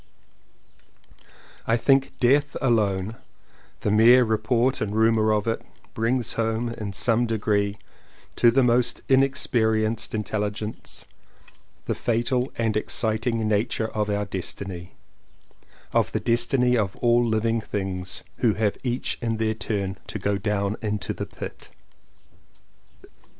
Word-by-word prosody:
I 115 - +3
think 135 +2 +3
death 140 +3 +3
alone 110 -4 +1 0.3
— - - -31
the 105 - 0
mere 120 +4 +7
report 115 +3 +1
and 105 -1 -2
rumour 110 -1 +3
of 105 -1 +1
it 115 0 -1 0.2
— - - -31
brings 115 +1 0
home, 115 +1 -1
in 110 -3 -5
some 115 +4 +2
degree, 105 -2 0 0.6
to 120 - +5
the 130 +3 +3
most 120 0 +2
inexperienced 115 -5 +1
intelligence 105 0 -4 0.8
the - - 0
fatal 125 +2 0
and 110 -2 0
exciting 110 +1 0
nature 110 +1 0
of 105 -1 -2
our 105 0 0
destiny, 95 -2 -6 1.0
of - - +1
the - - +1
destiny 125 +1 +2
of 100 -5 0
all 120 0 +3
living 115 0 +1
things 95 -4 -4
who 115 -5 +2
have 105 -1 0
each 125 -1 -2
in 115 -2 -1
their 110 0 0
turn 100 -3 -3
to - - -4
go 100 0 -1
down 100 0 -1
into 105 -3 -2
the - - -5
pit. - - -8
110 Hz, 130 wpm, -25 LUFS, 105-120 Hz, 1.0 s, mere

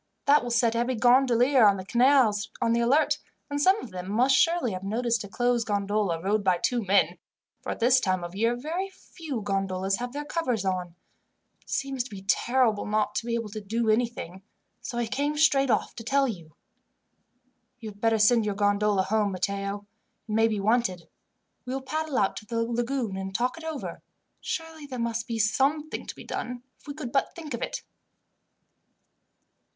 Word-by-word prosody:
That 290 +1 +5
will 245 - -5
set 230 -1 +2
every 240 +2 0
gondolier 250 +2 +4
on 200 -1 +4
the 185 - -7
canals 240 -3 +3
on 230 - +2
the 235 - +2
alert, 260 +6 +3 0.3
and 285 0 -1
some 380 +7 +4
of 225 - -9
them 180 0 -6
must 255 +5 +4
surely 330 -3 +2
have 185 -1 -5
noticed 230 +2 0
a - - -8
closed 240 +2 0
gondola 205 -4 0
rowed 200 +4 0
by 185 -2 +3
two 240 +6 0
men, 180 -3 +2 0.4
for - - -4
at - - -5
this 250 +2 +5
time 185 -6 0
of 175 0 -6
year 230 +4 +1
very 330 +10 -3
few 315 - -7
gondolas 195 -1 -1
have 245 0 -4
their 290 +2 -5
covers 250 - -1
on. 180 -2 -2 0.7
It - - -23
seems 270 -2 -1
to - - -10
be 195 -3 -9
terrible 240 -1 +2
not 210 0 0
to 230 - -3
be 235 - 0
able 230 -2 -3
to 215 +1 -6
do 220 +2 0
anything, 215 -6 -2 0.4
so 250 -1 -6
I 240 - 0
came 285 +6 -1
straight 275 -3 +4
off - - +1
to 230 - -6
tell 275 +4 +2
you." 170 - -7 1.2
"You 225 -3 -7
had 205 0 -14
better 225 -1 +3
send 220 +2 +4
your 205 -1 -2
gondola 205 -1 +2
home, 210 0 +1
Matteo. 200 +2 -3 0.4
It - - -7
may 225 +1 +4
be 215 -2 -1
wanted. 205 -4 0 0.5
We 255 +1 -4
will 270 - -3
paddle 310 +1 -2
out 195 - +2
to 215 - -8
the 230 0 -1
lagoon 235 -2 -2
and 190 0 -5
talk 250 +3 0
it 330 - -11
over. 320 -3 -5 0.4
Surely 325 -3 -5
there 260 -2 -6
must 235 -1 -2
be 230 -2 -3
something 275 +8 0
to - - -6
be - - -11
done, 250 0 -5 0.2
if - - -23
we 285 - -6
could 280 -6 -6
but 275 - 0
think 315 -5 -7
of 235 - -4
it. - - -4
230 Hz, 195 wpm, -27 LUFS, 205-260 Hz, 1.2 s, That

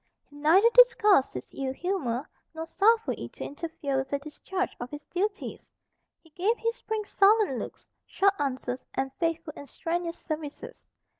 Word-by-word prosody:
He 290 - -19
neither 325 +9 +5
disguised 425 - +6
his 125 - -5
ill 265 -1 -3
humour, 285 -7 -2 0.3
nor 320 0 -4
suffered 445 +6 +2
it - - -7
to - - -7
interfere 290 -2 -3
with 265 0 -2
the 280 - 0
discharge 365 +6 -4
of 245 - -5
his 295 +1 -8
duties. 400 +3 -3 0.5
He 325 - -22
gave 395 +9 +1
his 460 +2 -2
prince 435 -3 -4
sullen 400 - +4
looks, - - -8 0.2
short 395 0 +3
answers, 260 -2 -2
and 265 0 -1
faithful 330 -2 -1
and 285 - -10
strenuous 335 +3 -3
services. 305 -2 -7
330 Hz, 160 wpm, -28 LUFS, 280-395 Hz, 0.5 s, disguised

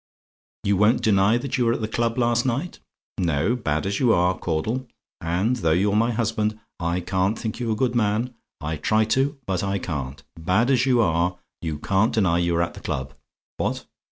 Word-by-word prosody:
You 100 -1 +2
won't 105 +4 +3
deny 100 +1 +4
that 130 +1 -3
you 125 - +3
were 115 - +3
at - - -3
the 110 - -1
club 115 +1 -1
last 120 -1 +2
night? 135 +8 -2 0.4
No, 85 +6 +1
bad 80 -10 -1
as 100 +1 -1
you 125 -4 +4
are, 90 +1 +3
Caudle 110 +12 -2 0.3
and 90 +9 0
though 80 -7 +2
you're 100 +4 +2
my 115 +2 +3
husband, 110 -2 -1 0.2
I 85 +1 -1
can't 95 +4 0
think 110 +1 -4
you 120 -2 -1
a - - +1
good 120 +2 0
man; 115 +2 0 0.3
I 80 +1 -3
try 110 +8 +2
to 130 +5 +2
do, - - -25
but 95 -1 -1
I 100 0 0
can't 70 -6 -5 0.2
bad 95 +10 +2
as 130 0 +3
you 125 -2 +4
are, 90 -2 +1 0.2
you 80 -3 -3
can't 110 +6 +1
deny 90 -6 +3
you 85 0 +1
were 85 +1 +2
at 85 - -4
the - - -10
club. 65 0 -4 0.4
What? - - -2
105 Hz, 210 wpm, -24 LUFS, 85-115 Hz, 0.4 s, deny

